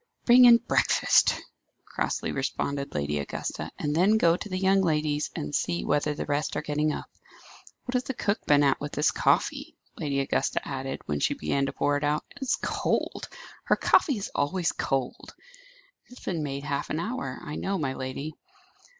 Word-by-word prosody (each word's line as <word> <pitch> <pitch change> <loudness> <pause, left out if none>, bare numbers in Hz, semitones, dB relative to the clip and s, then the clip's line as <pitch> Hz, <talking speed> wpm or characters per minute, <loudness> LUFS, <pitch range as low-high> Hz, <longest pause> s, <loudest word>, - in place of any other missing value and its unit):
'" - - -45
"Bring 250 +1 +8
in 235 -1 +9
breakfast," - - +3 0.5
crossly - - -2
responded 140 0 -3
Lady 75 0 -1
Augusta. 70 - -4
"And 150 -1 -1
then 195 +6 +4
go 170 -5 +4
to 205 - -7
the 185 - -2
young 195 +1 +3
ladies, 150 -3 0
and 75 0 -4
see 85 0 -1
whether 150 +1 +1
the - - -4
rest 145 +1 -1
are 150 - -2
getting 150 +1 0
up. - - -5 0.8
What 250 - -4
has 250 0 0
the 265 - -4
cook 205 0 -1
been 145 0 +5
at 140 -1 +2
with 145 0 -5
this 150 - +2
coffee?" - - +1 0.2
Lady 140 -2 -1
Augusta 135 - -1
added, 135 -1 -4
when 75 -1 -2
she - - +1
began 135 - 0
to - - -2
pour 145 0 +1
it 145 - -5
out. 150 +1 +1
"It 285 - -14
is 270 - +1
cold. - - -1 0.4
Her - - +4
coffee 280 -8 +3
is 200 - -5
always 165 +4 0
cold." 135 -2 -3 0.7
"It 250 - -15
has - - -14
been 170 -4 -2
made 140 -1 -4
half 140 -1 -3
an 155 - -1
hour, 170 - -4
I 150 - -7
know, 195 0 -1
my 140 -6 -1
lady." 130 +4 -5
150 Hz, 195 wpm, -27 LUFS, 140-190 Hz, 0.8 s, in